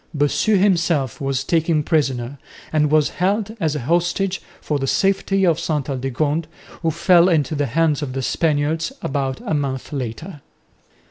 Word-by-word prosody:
Bossu 145 +9 +2
himself 170 - +1
was 135 -1 -1
taken 160 0 +1
prisoner 135 -4 -1 0.3
and 150 -1 +3
was 155 -1 +3
held 205 +3 0
as 155 -5 0
a 150 - -3
hostage 175 +6 0 0.2
for 150 -2 -2
the 135 - -2
safety 195 +3 +1
of 165 -3 +2
Ste 150 -3 -2
Aldegonde, 145 +5 -1 0.3
who 165 - +1
fell 175 +2 +4
into 155 -4 +1
the 145 -1 0
hands 155 +3 +1
of 135 -3 -4
the 135 0 -3
Spaniards 155 - 0
about 135 -1 -2
month 135 -1 -3
later. 140 +5 -5
150 Hz, 150 wpm, -20 LUFS, 135-170 Hz, 0.3 s, fell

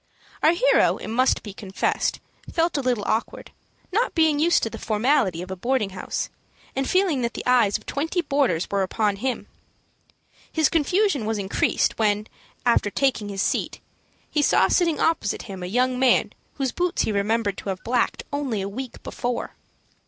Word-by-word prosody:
Our 315 - +5
hero, - - +3
it - - -7
must 255 +4 +2
be 205 - -8
confessed, 195 -1 -1 0.3
felt 335 +1 +1
a 285 - +1
little 250 -5 0
awkward, 225 - -2 0.4
not 450 +7 0
being 315 -3 +3
used 340 +3 +3
to 225 - 0
the - - -7
formality 215 - +1
of 185 - -9
a - - -3
boarding 235 +1 0
house, 185 -1 -3 0.5
and 270 0 -1
feeling 365 -8 +2
that 235 -1 -2
the - - -5
eyes 240 -5 +4
of 215 - -20
twenty 325 +5 -1
boarders 270 - +1
were 200 -1 +1
upon 205 +1 0
him. 255 +3 -2 1.1
His 315 -1 +2
confusion 330 - +1
was 220 -1 0
increased, 195 +2 0
when, 210 -1 +2 0.4
after 235 -3 +3
taking 230 -3 0
his 195 -1 -1
seat, - - -1 0.5
he 300 - 0
saw - - +4
sitting 335 -4 +2
opposite 320 -11 0
him, 195 -4 -8
a 180 - -4
young 250 +5 +1
man 260 -1 +3 0.2
whose 270 -3 -1
boots 360 +5 0
he - - -1
remembered 205 0 0
to - - -6
have 185 -1 -4
blacked 240 0 0
only 275 -7 -1
a - - -3
week 245 +5 -7
before. 245 0 -3
245 Hz, 175 wpm, -24 LUFS, 205-290 Hz, 1.1 s, Our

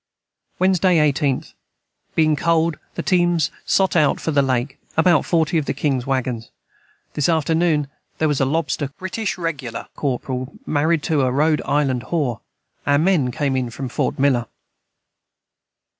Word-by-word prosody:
Wednesday 185 -1 +3
18th. 145 -3 +1 0.6
Being 155 -1 +3
cold 165 0 +1 0.2
the - - -3
teams 175 -3 +2 0.2
sot 190 -1 +2
out 150 -4 +3
for 160 - -2
the 145 -2 +3
Lake 130 +1 -1 0.2
about 165 -1 +4
40 165 -1 +2
of 150 - -3
the - - -1
Kings 135 -4 -1
waggons 125 -4 -2 0.6
this 150 +2 +1
afternoon 160 -2 +2 0.3
their 160 - +1
was 145 -3 0
a - - +4
Lobster 150 0 -1
Corperel 145 - -4
married 155 +1 +1
to 155 -4 +1
a 130 - +2
Road 150 +3 +2
Island 135 -5 0
whore 140 -8 -1 0.5
our 145 0 +4
men 160 -5 +2
came 135 +2 -1
in 130 -2 -1
from 130 +3 -6
Fort - - -1
Miller. 130 -4 +2
150 Hz, 140 wpm, -21 LUFS, 135-165 Hz, 0.6 s, about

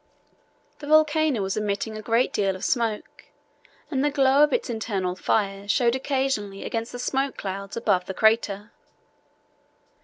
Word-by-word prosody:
The 290 - -8
volcano 310 -5 +3
was 190 0 -2
emitting 210 +1 -2
a 215 - -6
great 230 +3 +1
deal 195 -2 0
of 185 - -5
smoke, 230 -4 -2 0.7
and 270 -2 0
the 295 - +3
glow 275 0 +3
of 300 - +3
its - - 0
internal 200 -6 -2
fires 195 0 -1
showed 240 0 +2
occasionally 260 -7 -2
against 230 0 -3
the 245 - -6
smoke 270 +2 -1
clouds 195 +1 -5
above 200 -6 +1
the 190 - -5
crater. 220 -1 +1
225 Hz, 150 wpm, -25 LUFS, 200-265 Hz, 0.7 s, volcano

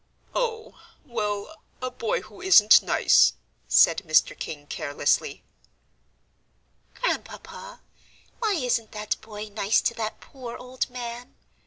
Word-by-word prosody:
"Oh, 455 -2 -3 0.3
well, 215 +3 -4 0.2
a 255 0 -4
boy 230 -3 -2
who 215 -1 -15
isn't 215 - +7
nice," - - +4 0.3
said - - +5
Mr. 155 -3 +3
King, 145 -2 -7
carelessly. 145 -1 -1 1.5
"Grandpapa, - - -5 0.6
why 440 -3 +1
isn't 245 -7 -1
that 210 0 -3
boy 215 -1 -8
nice 205 0 +1
to - - 0
that 220 -2 -4
poor 250 -4 -9
old 255 +1 -4
man?" 245 0 -7
230 Hz, 115 wpm, -25 LUFS, 210-255 Hz, 1.5 s, isn't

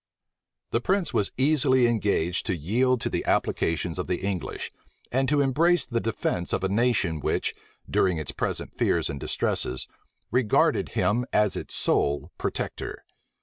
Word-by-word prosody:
The 115 - +1
prince 190 +4 0
was 100 - +1
easily 130 -2 +4
engaged 100 -7 +1
to 95 - +1
yield 115 - +1
to - - -1
the - - -1
applications 85 +1 0
of 90 - -3
the 90 +1 -2
English, 95 -7 -3 0.4
and 130 +1 +1
to 145 -1 +3
embrace 165 +6 +3
the 120 -2 -1
defence 105 -6 -1
of 95 - 0
a 95 - +1
nation 105 -7 +1
which, - - 0 0.3
during 90 -3 +2
its 75 -3 -2
present - - -2
fears - - +1
and 70 - -6
distresses, 65 -1 -1 0.4
regarded 120 -3 +2
him 120 +4 +1
as 105 -2 +3
its - - -4
sole 70 0 +1
protector. - - -4
110 Hz, 150 wpm, -26 LUFS, 90-130 Hz, 0.4 s, easily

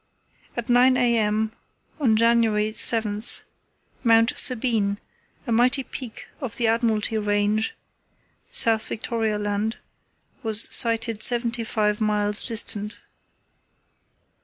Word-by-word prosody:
At 235 - -5
9 250 +1 +3
a.m. 220 -3 0 0.5
on 240 -7 +1
January 225 -2 +1
7, 215 -2 0 0.8
Mount 230 0 +3
Sabine, 225 -5 +2 0.5
a 240 - -5
mighty 250 +4 +2
peak 250 -3 -10
of 260 -7 -5
the 240 - 0
Admiralty 225 -1 0
Range, 205 +1 -1 0.8
South 225 - +2
Victoria 220 -1 -3
Land, 210 +2 -3 0.6
was 220 -1 +5
sighted 230 -2 +1
seventy 240 -1 +1
five 210 -1 -2
miles 210 -1 +2
distant. 210 -2 +1
225 Hz, 100 wpm, -22 LUFS, 210-235 Hz, 0.8 s, was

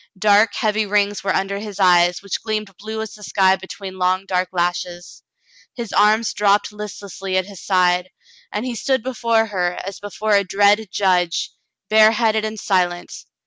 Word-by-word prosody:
Dark, 205 +1 +4
heavy 215 0 0
rings 205 0 0
were 195 - 0
under 195 +1 -1
his 205 -1 -8
eyes, 180 0 +4
which 200 - -4
gleamed 215 -3 -4
blue 220 +2 -5
as 220 - -9
the 210 - -14
sky 190 -2 +3
be 190 0 -12
tween 190 -1 -8
long 185 +1 +1
dark 185 -1 -1
lashes. 175 0 -3 0.5
His 235 -4 -6
arms 215 +2 +3
dropped 205 0 +2
listlessly 200 -2 -5
at 185 - 0
his 200 -2 -11
side, 180 -1 +2 0.4
and 210 +4 -3
he 250 - -3
stood 260 +2 -1
before 230 -3 +1
her, 180 -5 -1
as 195 0 -7
before 205 +1 -4
a 200 0 +4
dread 205 +3 +2
judge, 180 -3 0 0.4
bareheaded 220 +1 +4
and 215 0 -4
silent. 180 -3 -1
200 Hz, 170 wpm, -20 LUFS, 185-215 Hz, 0.5 s, Dark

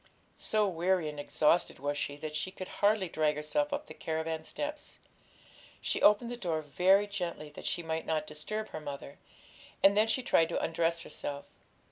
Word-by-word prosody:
So 215 -1 +2
weary 180 -2 +1
and 150 -1 -7
exhausted 150 +3 +2
was 145 +1 -2
she, 145 0 -2
that 155 +1 -6
she 155 +4 -1
could 185 -1 -7
hardly 205 -2 +4
drag 155 -2 +1
herself 290 - 0
up 285 +1 -2
the - - -10
caravan 160 0 -3
steps. 295 - -5 0.8
She - - -1
opened 210 +3 +5
the - - -3
door 165 -8 -1
very 185 +7 +4
gently, 175 -7 -4
that - - -6
she 175 - -1
might 160 0 -3
not 155 -1 0
disturb 215 +9 -4
her 155 - -6
mother, 140 -1 -7 0.6
and 195 +1 +7
then 215 +2 +5
she 250 +3 +1
tried 165 -10 +4
to - - 0
undress 165 0 0
herself. 145 -2 -6
165 Hz, 180 wpm, -31 LUFS, 155-205 Hz, 0.8 s, and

